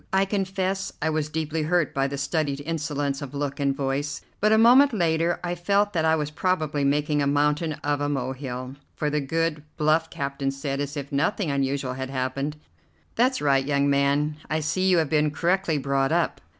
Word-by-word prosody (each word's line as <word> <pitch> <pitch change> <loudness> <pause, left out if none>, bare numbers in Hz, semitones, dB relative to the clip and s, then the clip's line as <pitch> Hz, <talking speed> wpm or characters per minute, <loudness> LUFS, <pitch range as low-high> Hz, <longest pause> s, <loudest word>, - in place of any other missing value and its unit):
I 190 0 +3
confess 190 -1 -2
I 160 +1 0
was 155 -1 -1
deeply 160 0 -2
hurt 165 -1 +1
by 135 0 +1
the 140 0 -4
studied 145 0 -1
insolence 145 -3 -2
of 140 -1 -7
look 140 0 -3
and 140 -1 +1
voice; 140 +2 -2 0.2
but 215 +1 +3
a 220 - +6
moment 250 +5 +6
later 170 -3 +1
I 175 0 -1
felt 200 +4 +1
that 160 -2 +1
I 160 0 +4
was 150 -1 -2
probably 155 -4 0
making 145 +1 +1
a 140 - +1
mountain 150 +3 +1
of 145 0 0
a 145 - 0
molehill, 130 -1 -4 0.2
for 150 -1 -1
the 150 0 0
good, 160 +2 -1 0.2
bluff 160 +1 +2
captain 140 -1 -3
said, 135 0 -3
as 145 +1 -4
if 140 -1 -6
nothing 160 +4 0
unusual 135 -1 -1
had 130 0 -5
happened: 135 +2 -2 0.6
"That's 255 - +2
right, 135 -2 +3
young 140 0 +1
man; 140 +2 +1
I 155 - 0
see 185 +5 0
you 180 - +4
have 160 -3 +1
been 150 -1 +3
correctly 170 +2 0
brought 135 -1 0
up. - - 0
150 Hz, 195 wpm, -25 LUFS, 140-165 Hz, 0.6 s, a